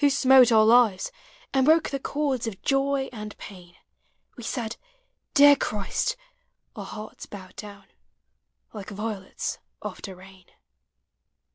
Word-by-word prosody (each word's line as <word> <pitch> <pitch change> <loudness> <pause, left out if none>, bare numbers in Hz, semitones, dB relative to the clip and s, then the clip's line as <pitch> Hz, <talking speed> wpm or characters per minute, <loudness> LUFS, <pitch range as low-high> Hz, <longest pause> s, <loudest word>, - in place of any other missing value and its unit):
smote 265 -2 +6
our 220 -1 +6
lives, 230 - +4 0.4
And 265 0 +3
woke 320 +1 +4
the 275 - -2
chords 270 -4 -2
of 200 -4 -6
joy 275 0 +1
and 210 -2 -8
pain, 180 -3 -12 0.6
We - - -10
said, 230 -1 -3 0.6
Dear 285 0 +8
Christ! 240 - -2 0.3
— - - -49
our - - -6
hearts 215 0 -9
bowed 185 -3 -11
down 200 -2 -10 0.9
Like 205 -3 -8
violets 205 -2 -5 0.2
after 190 -2 -7
rain. 190 0 -16
225 Hz, 125 wpm, -25 LUFS, 200-270 Hz, 0.9 s, Dear